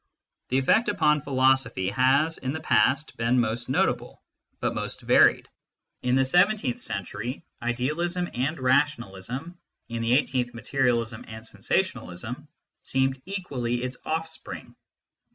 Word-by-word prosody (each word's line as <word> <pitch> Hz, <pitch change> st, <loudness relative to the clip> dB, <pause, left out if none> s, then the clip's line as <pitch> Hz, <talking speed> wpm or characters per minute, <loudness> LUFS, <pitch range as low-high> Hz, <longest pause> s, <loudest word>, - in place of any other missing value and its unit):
The 130 Hz, -, +2 dB
effect 210 Hz, -, +3 dB
upon 150 Hz, -7 st, +3 dB
philosophy 130 Hz, -8 st, +2 dB
has, 135 Hz, +8 st, +2 dB
in 130 Hz, +1 st, -3 dB
the 160 Hz, -, -3 dB
past, 145 Hz, -1 st, +2 dB
been 115 Hz, +2 st, +2 dB
most 120 Hz, +1 st, -1 dB
notable, 130 Hz, -, 0 dB, 0.4 s
but -, -, -1 dB
most -, -, -4 dB
varied; -, -, +5 dB, 0.5 s
in 125 Hz, 0 st, +1 dB
the 135 Hz, 0 st, +4 dB
seven 180 Hz, +10 st, +4 dB
teenth 125 Hz, -12 st, -3 dB
century, 105 Hz, -, -5 dB, 0.2 s
idealism 150 Hz, +9 st, -1 dB
and 135 Hz, +6 st, -1 dB
rationalism, 130 Hz, -, -1 dB, 0.3 s
in 115 Hz, 0 st, -3 dB
the 115 Hz, +2 st, +4 dB
eigh 145 Hz, -, +3 dB
teenth, 125 Hz, -2 st, -2 dB
materialism 120 Hz, -3 st, 0 dB
and 110 Hz, 0 st, -9 dB
sensationalism, 115 Hz, -, -3 dB, 0.3 s
seemed 130 Hz, 0 st, 0 dB
equally 130 Hz, -11 st, -2 dB
its 130 Hz, 0 st, -4 dB
offspring. 160 Hz, 0 st, -5 dB
130 Hz, 130 wpm, -26 LUFS, 120-150 Hz, 0.5 s, varied